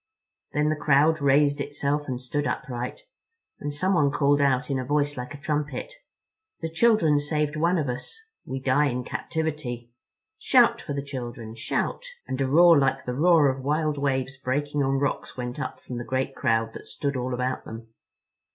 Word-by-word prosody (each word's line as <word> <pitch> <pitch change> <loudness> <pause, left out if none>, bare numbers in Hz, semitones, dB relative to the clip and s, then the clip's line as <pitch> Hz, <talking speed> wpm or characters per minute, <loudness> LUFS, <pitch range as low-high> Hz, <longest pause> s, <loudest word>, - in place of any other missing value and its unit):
Then 150 +1 +2
the 155 - +1
crowd 150 +1 +3
raised 145 +1 +3
itself 145 +1 -2
and 125 -2 -3
stood 145 +3 -2
upright, 125 -4 -4 0.6
and 145 - -3
someone 150 -1 +2
called 145 0 +2
out 135 -1 +2
in 135 - 0
a - - -2
voice 145 +2 0
like 125 +3 -6
a - - -11
trumpet: 150 - -3 0.7
"The 165 - -3
children 165 -6 +4
saved 150 0 -1
one 170 +4 +2
of 150 -4 -1
us—We 445 - -7
die 140 +3 +3
in 125 -1 -2
captivity. 135 -6 -4 0.5
Shout - - +4
for - - -5
the 140 0 -3
children. 120 -5 -6
Shout!" 115 - -2 0.2
And 130 - -3
a 135 - +1
roar 165 +3 +7
like 135 -1 +1
the 125 - -2
roar 160 +1 +5
of 130 0 -1
wild 150 +1 0
waves 135 -1 -1
breaking 145 +3 -1
on 135 0 +1
rocks 140 -1 -2
went 125 0 -4
up - - -4
from 125 - -7
the 120 - -4
great 130 +2 -2
crowd 115 0 +1
that - - -10
stood 140 -1 -3
all 125 0 -2
about 125 +1 -2
them. 115 0 -9
140 Hz, 180 wpm, -26 LUFS, 130-150 Hz, 0.7 s, roar